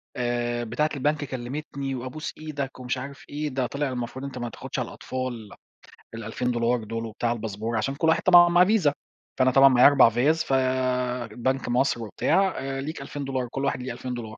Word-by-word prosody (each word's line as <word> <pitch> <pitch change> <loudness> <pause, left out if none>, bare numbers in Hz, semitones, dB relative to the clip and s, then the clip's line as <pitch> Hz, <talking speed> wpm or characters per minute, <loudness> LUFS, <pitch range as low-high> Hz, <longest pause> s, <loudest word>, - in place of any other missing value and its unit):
آآ 120 -1 -1
بتاعة 150 +7 0
البنك 145 +2 0
كلمتني 135 +1 -5
وأبوس 130 +5 -5
إيدك 145 -4 -5
ومش 125 -1 -2
عارف 140 +1 -8
إيه، 150 +1 -3
ده 130 -2 -1
طلع 140 +1 -2
المفروض 125 +2 -5
أنت 135 -2 -7
ما 120 -1 -3
تاخدش - - -6
على - - -2
الأطفال 125 -4 -5 0.6
ال2000$ 115 +1 -1
دول 115 +1 -4
وبتاع 115 +1 -2
الباسبور، 110 0 -3
عشان 135 +5 -1
كل 160 +3 0
واحد 160 - +3
طبعًا 175 -1 +8
معاه 175 +1 +6
فيزا، 190 -8 +3 0.5
فأنا 130 0 +4
طبعًا 135 +1 +7
معايا 125 -1 +7
4 145 -4 +6
فيز، 145 +8 +2
ف 135 - -2 0.8
بنك 130 +3 -1
مصر 120 -1 +1
وبتاع، 190 - +1
آآ 135 0 -3
ليك 150 +1 -5
2000$ 135 -2 -4
كل 135 +1 -2
واحد 140 - -1
ليه 125 -1 -4
2000$ 125 -1 -5
دولار. 110 - -11
130 Hz, 185 wpm, -25 LUFS, 120-145 Hz, 0.8 s, طبعًا